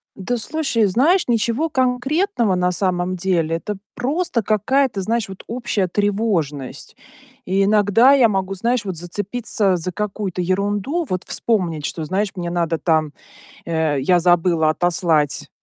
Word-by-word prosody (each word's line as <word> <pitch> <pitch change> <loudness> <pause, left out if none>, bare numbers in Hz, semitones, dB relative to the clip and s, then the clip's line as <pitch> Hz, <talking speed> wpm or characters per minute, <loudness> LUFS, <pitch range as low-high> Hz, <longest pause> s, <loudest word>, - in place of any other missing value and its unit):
Да, 205 +6 -3
слушай, 275 -2 -1
знаешь, 285 - +2
ничего 235 +7 +1
конкретного 255 - +1
на 180 0 +1
самом 185 -1 -1
деле, 170 -3 0
это 205 +3 -5 0.2
просто 270 - -1
какая-то, 220 +1 +1
знаешь, 225 0 -1
вот 190 - -10
общая 225 -5 -1
тревожность. 190 - -2 0.5
И 195 +1 +1
иногда 210 +5 +4
я 260 -5 +6
могу, 195 -2 -1
знаешь, 230 +3 0
вот 185 -4 -4
зацепиться 200 +2 -1
за 180 +2 -2
какую-то 200 -3 -3
ерунду, 205 - -1
вот 185 -1 -2
вспомнить, 175 -10 -1
что, 160 - -4
знаешь, 195 +6 -1
мне 175 -1 -4
надо 170 -2 0
там 155 -3 0 0.5
Э, 160 -4 0
я 175 +6 +3
забыла 170 -2 +3
отослать, 165 -3 0
195 Hz, 140 wpm, -20 LUFS, 175-235 Hz, 0.5 s, я